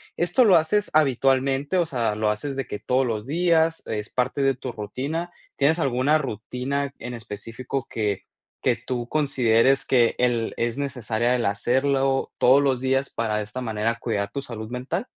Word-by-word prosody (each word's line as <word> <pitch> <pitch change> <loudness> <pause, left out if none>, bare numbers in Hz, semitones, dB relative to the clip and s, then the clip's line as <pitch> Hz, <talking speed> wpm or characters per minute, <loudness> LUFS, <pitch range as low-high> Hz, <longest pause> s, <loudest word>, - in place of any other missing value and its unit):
¿Esto 175 +9 +3
lo 200 - +6
haces 205 +6 +2
habitualmente? 135 +1 +2
O 175 - +3
sea, 120 -8 -1
¿lo 110 0 +1
haces 135 +6 -3
de 135 - -3
que 105 - -5
todos 130 +1 +1
los 110 -2 -3
días? 165 +1 +2
¿Es 105 -1 -4
parte 130 +3 -1
de 135 -2 +3
tu 130 -1 -6
rutina? 135 +11 -4 0.3
¿Tienes 155 +5 +3
alguna 135 +1 +2
rutina 135 +3 -3
en 120 +1 -6
específico, 115 +4 -5
que 105 -3 -2 0.4
que - - +2
tú 120 -2 -4
consideres 135 -3 +2
que 120 -3 +3
el 120 -2 0
es 115 +1 -1
necesaria, 120 -3 0
el 120 - -1
hacerlo 135 +6 +1
todos 135 +3 +5
los 135 -3 +1
días, 135 +1 0
para, 110 -2 -1
de 105 - -1
esta 110 +5 -7
manera, 115 0 -1
cuidar 100 -4 -2
tu 140 - -4
salud 110 -3 -7
mental? 130 - -3
130 Hz, 175 wpm, -24 LUFS, 115-140 Hz, 0.4 s, lo